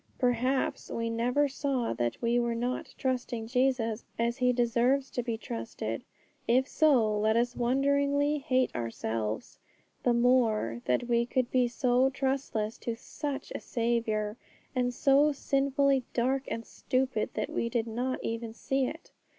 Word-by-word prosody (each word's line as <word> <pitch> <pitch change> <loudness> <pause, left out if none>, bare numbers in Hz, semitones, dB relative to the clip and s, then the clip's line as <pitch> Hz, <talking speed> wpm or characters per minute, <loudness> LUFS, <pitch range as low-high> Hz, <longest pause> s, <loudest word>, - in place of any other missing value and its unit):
Perhaps 250 +1 0
we 230 0 -2
never 245 +5 +2
saw 270 -3 -1
that 120 -1 -2
we 235 +1 +3
were 235 -1 0
not 245 +2 -3
trusting 250 -3 -2
Jesus 245 -2 +1
as 235 +1 0
He 250 -1 +3
deserves 245 +3 +2
to 245 - -1
be 230 -2 -3
trusted; 115 - -5 0.4
if 255 +3 +3
so, 240 -11 +3
let 220 +1 +2
us 240 +1 +1
wonderingly 280 +3 +2
hate 260 -3 +1
ourselves 115 -2 -3 0.4
the 245 - +3
more 230 - +2
that 125 - +1
we 235 0 +2
could 250 -1 0
be 250 -1 +3
so 250 +1 +2
trustless 265 -5 -2
to 235 - -3
such 285 +4 -5
a - - -3
Saviour, 230 -2 -1 0.4
and 250 -1 +1
so 280 +4 +4
sinfully 275 -1 +1
dark 265 +3 +1
and 230 - -4
stupid 255 -4 -1
that - - -2
we 235 - -1
did 235 -1 0
not 245 +3 -2
even 230 0 -4
see 270 +1 0
it. 325 +5 -8
245 Hz, 150 wpm, -29 LUFS, 230-265 Hz, 0.4 s, so